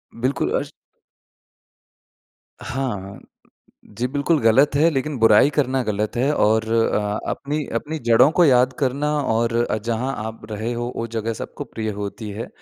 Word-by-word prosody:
बिल्कुल। 130 +4 -1
अश - - -7 1.9
हाँ। 105 -8 -4 0.8
जी 125 +2 0
बिल्कुल 145 +4 +1
गलत 120 +6 +4
है 155 +4 +4
लेकिन 150 -1 -2
बुराई 115 +4 +6
करना 135 -3 0
गलत 105 0 -2
है। 130 +4 +1
और 110 -3 +2
अ, 105 -2 +1
अपनी, 150 +2 -3
अपनी 150 +7 -3
जड़ों 115 +4 +6
को 175 - +7
याद 130 -2 +4
करना 140 +2 0
और 115 -2 0
अ, 120 -2 +1
जहाँ 115 +4 -2
आप 110 0 -7
रहे 110 +3 -3
हो 120 +1 -3
वो 115 - -3
जगह 115 +1 -1
सबको - - -7
प्रिय 110 -1 -5
होती 105 +2 -5
है। 110 +4 -6
120 Hz, 150 wpm, -21 LUFS, 110-135 Hz, 1.9 s, को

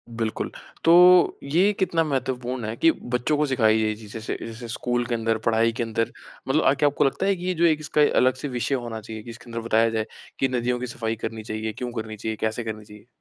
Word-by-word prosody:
बिल्कुल। 115 -1 -2 0.3
तो 180 +1 +7
ये 175 +9 +3
कितना 175 -3 +2
महत्वपूर्ण 130 -4 -2
है 110 +1 -4
कि 165 +7 +4 0.2
बच्चों 145 +5 +1
को 150 - +2
सिखाई 110 -5 +3
ये 110 -1 +1
चीज़े 110 +1 -9
से - - -4
जैसे 115 +1 -7
स्कूल 120 +1 -1
के 120 - -1
अंदर, 115 -1 0
पढ़ाई 115 +1 +2
के 120 +1 -3
अंदर, 115 +1 -1 0.4
मतलब 150 +4 +2
अ, 135 - +5
क्या 145 +1 +2
आपको 145 - 0
लगता 135 +7 0
है 195 0 +3
कि 180 0 -7
ये 185 - +1
जो 170 0 +2
एक 155 -2 +3
इसका 150 0 0
अ, 145 - +5
अलग 130 0 +4
से 145 - -5
विषय 125 +2 -1
होना 120 -3 -5
चाहिए? 110 0 -8
कि - - -11
इसके 120 +1 -11
अंदर 115 - -3
बताया 115 0 +3
जाए 110 -1 -1 0.3
कि 135 - +3
नदियों 125 0 -1
की 125 - -4
सफाई 115 -1 -3
करनी 110 -1 -5
चाहिए, 110 0 -4
क्यों 125 -1 -5
करनी 110 -1 -8
चाहिए, 110 +1 -3
कैसे 110 +2 -1
करनी 110 -1 -6
चाहिए? 105 +1 -15
120 Hz, 245 wpm, -24 LUFS, 110-140 Hz, 0.4 s, तो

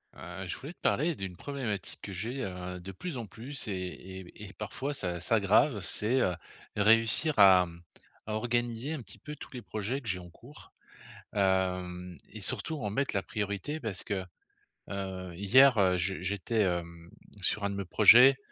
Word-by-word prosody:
Heu, 90 +2 -7
je - - -4
voulais 150 +6 -8
te - - -43
parler 150 +11 +1
d'une 95 -5 -6
problématique 120 -5 -4
que 100 - -7
j'ai, 120 +8 -4
heu, 90 -2 -5
de 95 +2 -8
plus 150 - -6
en 120 - -4
plus 125 +6 -7
et 105 - -2 0.5
et - - -8
b - - -15
et - - -11
et - - -14
parfois 130 +7 -4
ça 90 -10 -3
s'aggrave, 105 - +3
c'est, 105 +8 0
heu, 90 - +1 0.4
réussir 115 +8 +4
à 95 -2 +8 0.6
à 110 - -4
organiser 120 +4 -1
un 155 - -4
petit 105 -2 -12
peu 150 - -8
tous - - -11
les 125 - -6
projets 110 +4 -3
que 120 - -12
j'ai 95 -2 -1
en 90 -1 -11
cours. 120 - -15 0.6
Heu, 90 -2 0 0.2
et - - -8
surtout 160 - 0
en 105 - -1
mettre 135 +5 -1
la 100 - +1
priorité. 105 - -3
Parce 110 -8 -4
que, 100 -2 -2 0.7
heu, 95 -2 -5
hier 125 +6 +6
heu, 95 -2 +4
je 90 0 -1
j'étais, 100 +4 0
hem, 85 -2 -3 0.3
sur 100 +2 0
un 100 - +1
de 100 - -4
mes 100 - -3
projets, 125 +8 +8
100 Hz, 190 wpm, -30 LUFS, 95-120 Hz, 0.7 s, à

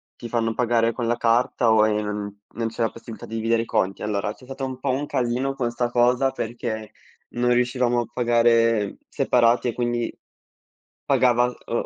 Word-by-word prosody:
ti 120 - -8
fanno 115 -1 0
pagare 115 -1 +1
con 120 -1 -3
la 120 - +1
carta 120 0 +2
o 110 -1 +5
ehm, 105 -1 -2 0.2
non 115 0 -2
c'è 115 +1 -6
la 115 - +2
possibilità 115 -1 -10
di 115 - -7
dividere 115 +1 +1
i - - -9
conti. 95 -3 -1
Allora 105 -1 -2
c'è 125 - -17
stato 135 +1 -7
un 130 -1 -6
po' 135 0 -1
un 135 +3 -1
casino 130 +2 -1
con 120 -3 -1
'sta 120 0 -1
cosa 125 +2 +3
perché 110 -2 -5 0.4
non 125 0 +1
riuscivamo 125 0 +2
a 120 - -1
pagare 115 -3 +2
separati 120 0 +2
e 120 - -1
quindi 120 -1 -1 0.9
pagava, 125 -1 +3
uhm, 120 -1 -4
120 Hz, 180 wpm, -23 LUFS, 115-125 Hz, 0.9 s, o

